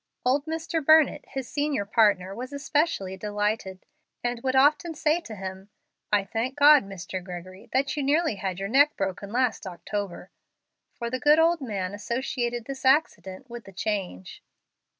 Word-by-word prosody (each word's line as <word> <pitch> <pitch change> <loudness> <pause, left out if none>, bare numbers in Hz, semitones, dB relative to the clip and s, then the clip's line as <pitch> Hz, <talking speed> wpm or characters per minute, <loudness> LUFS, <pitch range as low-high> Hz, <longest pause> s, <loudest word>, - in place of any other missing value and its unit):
Old 280 +4 +2
Mr. 325 0 -2
Burnett, 315 +1 +5
his 265 -2 -5
senior 285 -6 -1
partner, 200 -3 +2
was 250 +5 -7
especially 280 - -1
delighted, 205 -1 -3 0.4
and 240 -1 -2
would 260 +1 -1
often 300 +5 +3
say 310 +2 +2
to 230 -10 -9
him, 190 0 -7 0.4
"I 205 -1 +3
thank 230 +7 -3
God, 290 -2 +7
Mr. 190 -1 -6
Gregory, 185 +4 -9
that 270 +2 +1
you 295 - -1
nearly 290 -3 +1
had 190 -2 -3
your 195 +1 -3
neck 285 +6 +4
broken 195 +1 -3
last 245 -4 0
October"; 195 +1 -5 0.6
for 235 -2 -5
the 255 - -2
good 295 +3 +5
old 330 0 +3
man 200 -6 -3
associated 240 +2 -3
this 270 0 -7
accident 260 -6 +1
with 240 -1 -9
the 195 - -13
change. 190 - -4
235 Hz, 160 wpm, -26 LUFS, 195-285 Hz, 0.6 s, God